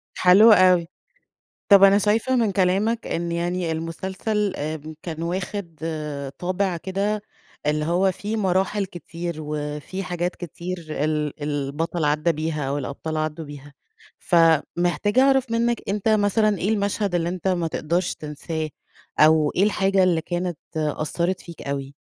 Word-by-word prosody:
حلو 195 +5 +7
أوي. 180 -4 +5 0.8
طب 200 -1 +8
أنا 195 0 +7
شايفة 220 +5 +2
من 230 -4 +2
كلامك 200 +5 +1
إن 170 0 -2
يعني 175 0 -1
المسلسل 190 +5 -2
آآ، 155 +1 -5
كان 165 -1 -5
واخد 180 -1 -4 0.6
طابع 185 0 -1
كده 200 +4 -2 0.4
اللي 150 +1 +1
هو 180 +4 +2
في 205 +4 -4
مراحل 195 +1 +1
كتير 170 -1 -6
وفي 150 +4 -4
حاجات 175 0 -2
كتير 175 0 -6
ال 150 0 -2
البطل 150 +3 -2
عدّى 150 +3 +2
بيها 155 -1 -3
أو 140 - -1
الأبطال 145 +3 -4
عدّوا 155 +1 -3
بيها. 145 0 -11 0.5
فمحتاجة 175 - +2
أعرف 265 -2 +3
منّك 235 +1 +1
أنت 205 +2 0
مثلًا 215 0 +2
إيه 190 - -1
المشهد 200 -2 0
اللي 170 -1 0
أنت 180 +1 -4
ما 175 -3 +1
تقدرش 170 +3 -1
تنساه 155 +1 -5 0.5
أو 155 -1 +5
إيه 190 - +3
الحاجة 195 -2 +2
اللي 175 -3 +2
كانت 175 0 -3 0.2
أثّرِت 165 +4 -1
فيك 170 -3 -11
أوي؟ 140 0 -4
175 Hz, 140 wpm, -23 LUFS, 155-195 Hz, 0.8 s, طب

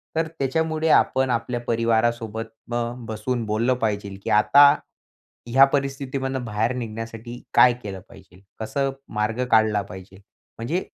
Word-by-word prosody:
तर 160 0 +1
त्याच्यामुळे 160 +3 0
आपण 130 -3 +3
आपल्या 120 0 -1
परिवारासोबत 115 -1 0 0.3
अ, 120 0 -1 0.2
बसून 110 +2 -3
बोललं 110 +4 +1
पाहिजे, 100 -2 -2
की - - -4
आता 140 +8 +6 0.8
या 135 +1 +8
परिस्थितीमधून 135 -1 -2
बाहेर 110 +2 -1
निघण्यासाठी 115 +1 -7
काय 120 +1 +6
केलं 100 -2 -6
पाहिजे? 90 0 -17 0.2
कसं 135 +5 -1 0.2
मार्ग 110 +3 -1
काढला 110 -2 +4
पाहिजे? 95 0 -11 0.4
म्हणजे 155 +12 -2
115 Hz, 125 wpm, -23 LUFS, 110-130 Hz, 0.8 s, या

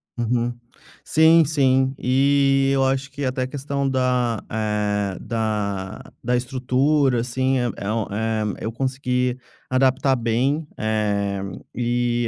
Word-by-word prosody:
Uhum. 120 0 -1 0.5
Sim, 160 +1 +5
sim, 135 -3 +2
e 135 +1 +3
eu 135 -1 +2
acho 135 +1 -1
que 140 +1 -6
até 130 0 -1
a - - -2
questão 140 0 -3
da, 125 -3 0
eh, 105 -3 -1
da 105 -4 -3 0.2
da 125 +1 +1
estrutura, 130 +2 +1
assim, 130 +2 0
eh, 120 -1 0
é 100 +1 -3
um 110 0 0
eh, 110 +1 -1 0.2
eu 110 - -2
consegui 125 0 -1 0.3
adaptar 130 +1 +2
bem. 130 +6 0 1.1
E 120 0 0
125 Hz, 120 wpm, -22 LUFS, 115-135 Hz, 1.1 s, Sim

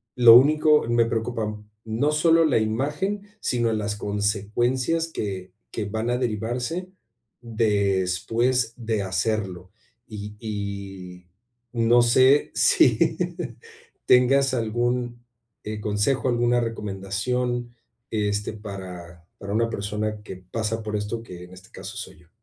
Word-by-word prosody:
lo 120 -2 +9
único 150 +4 +5
me 120 0 +3
preocupan, 110 -2 -3 0.2
no 115 +7 0
solo 165 +1 +4
la 140 - +3
imagen, 150 - -2
sino 120 -2 0
las 105 -1 -2
consecuencias 110 +10 0
que 95 - -5 0.2
que 110 - -3
van 110 +3 -3
a 125 - +1
derivarse 125 - -2 0.5
después 110 +2 +1
de 110 -4 -2
hacerlo. 95 -1 -2 0.4
Y 105 -1 -8
y 100 -4 -6 0.5
no 120 +1 +4
sé 130 +4 +4
si - - +4 0.9
tengas 130 +2 +4
algún, 120 +1 -1 0.4
eh, 105 0 -5
consejo, 105 +6 0
alguna 120 0 +2
recomendación, 120 +3 -2 0.3
este, 105 -1 -1
para 90 -5 -9
para 100 0 -6
una 115 +1 +1
persona 105 0 -3
que 95 - -8
pasa 110 +4 -3
por 105 0 -3
esto, 105 +3 -4
que 90 -4 -10
en 90 - -15
este 95 0 -15
caso - - -9
soy - - -8
yo. 85 -1 -23
110 Hz, 120 wpm, -24 LUFS, 100-120 Hz, 0.9 s, lo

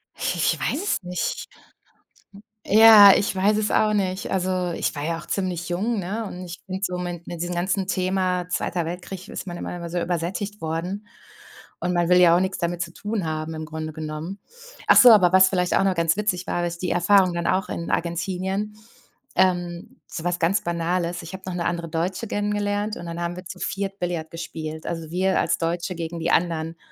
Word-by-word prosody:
Ich - - -2 0.2
ich - - -8
weiß 295 - -1
es 410 - 0
nicht. 180 -1 -3 1.2
Ja. 215 -1 +9
Ich 200 - 0
weiß 205 +3 +3
es 215 0 0
auch 215 0 +3
nicht. 190 -2 -1
Also, 185 -1 0
ich - - -2
war 145 - -4
ja 165 +2 -1
auch - - -11
ziemlich 180 -3 -2
jung, 210 +5 -1
ne? 205 +5 -3
Und 180 -2 -7
ich 175 0 -8
finde 190 -1 -5
so 180 -2 -1
mit 175 -1 -5
mit 170 -2 -5
diesem 175 0 -3
ganzen 185 +2 0
Thema 185 -1 0
„Zweiter 175 -2 -1
Weltkrieg“ 180 +2 -7
ist - - -6
man 175 - -5
immer - - -5
immer 170 -1 -6
so 175 +1 -2
übersättigt 180 +4 -3
worden. 175 +6 -3 0.8
Und 180 - 0
man 175 -1 +2
will 180 +1 +5
ja 170 -1 +7
auch - - +4
nix 190 +1 -1
damit 175 0 -2
zu 170 0 -4
tun 210 -2 -3
haben, 155 0 -3
im 155 0 -5
Grunde 155 0 -5
genommen. 155 +4 -6 0.5
Ach - - +7
so, 250 - +9
aber 185 -5 +6
was 190 0 +7
vielleicht 180 -2 +1
auch - - +3
noch 195 -1 +2
ganz 165 -1 +2
witzig 195 -3 -1
war, - - -2
habe 175 0 0
ich 170 0 -5
die 180 0 -2
Erfahrung 185 +1 +4
dann 170 0 -2
auch 190 +1 +1
in 170 - -4
Argentinien, 190 +4 -2 0.6
ähm, 180 +5 0
so 165 - -6
was 175 0 -1
ganz 175 +5 +2
Banales. 170 +1 -1
Ich 165 - -9
habe 190 - -8
noch 185 - -4
'ne 170 -1 -2
andere 170 -1 -2
Deutsche 175 +7 -2
kennengelernt. 205 0 -1
Und - - -8
dann 170 0 -5
haben 175 0 -2
wir 180 - -8
zu 180 +1 -9
4 195 0 -3
Billiard 170 -3 -3
gespielt. 160 -1 -6
Also, 165 -2 -4
wir 190 +1 +1
als 170 - +1
Deutsche 170 +2 -2
gegen 165 0 -5
die 165 +1 0
anderen. 165 -1 0
180 Hz, 210 wpm, -24 LUFS, 170-190 Hz, 1.2 s, Ja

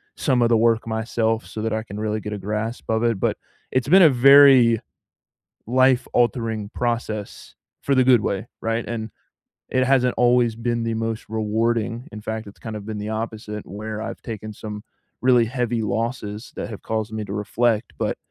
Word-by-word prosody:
some 130 -4 +1
of 115 - +3
the 115 - +4
work 115 0 +2
myself 110 0 -1
so 110 - -7
that 110 0 -1
I 110 - -1
can 105 -1 -8
really 110 0 -1
get 105 0 -5
a - - -3
grasp 105 +4 -4
of 110 0 +1
it. 115 -4 +1
But - - 0 0.3
it's 130 +1 0
been 190 +5 +7
a 160 - +8
very 130 -3 +7 0.9
life-altering 120 -4 +1
process 115 -3 -3 0.3
for 140 - +1
the 130 -1 +4
good 125 -3 +5
way. 100 +3 -2
Right, 115 +1 -1
and 110 -2 -4 0.6
it 130 0 +1
hasn't 125 -2 +3
always 120 -2 +3
been 120 0 -1
the 115 0 -1
most 115 0 -3
rewarding. 115 +2 -1
In 105 - -7
fact, 110 0 -5
it's 100 - -14
kind 110 -2 -7
of 105 - -7
been 110 -1 -5
the 105 +1 -4
opposite 110 -1 -5
where 105 +2 -6
I've 110 - -6
taken 110 -1 -6
some 105 0 -7 0.4
really 125 -2 +5
heavy 120 -1 -1
losses 110 0 -3
that - - -4
have 105 - -8
caused 110 0 -3
me 110 -1 -3
to 100 - -7
reflect. 110 +2 0
But - - -1
115 Hz, 185 wpm, -22 LUFS, 110-120 Hz, 0.9 s, a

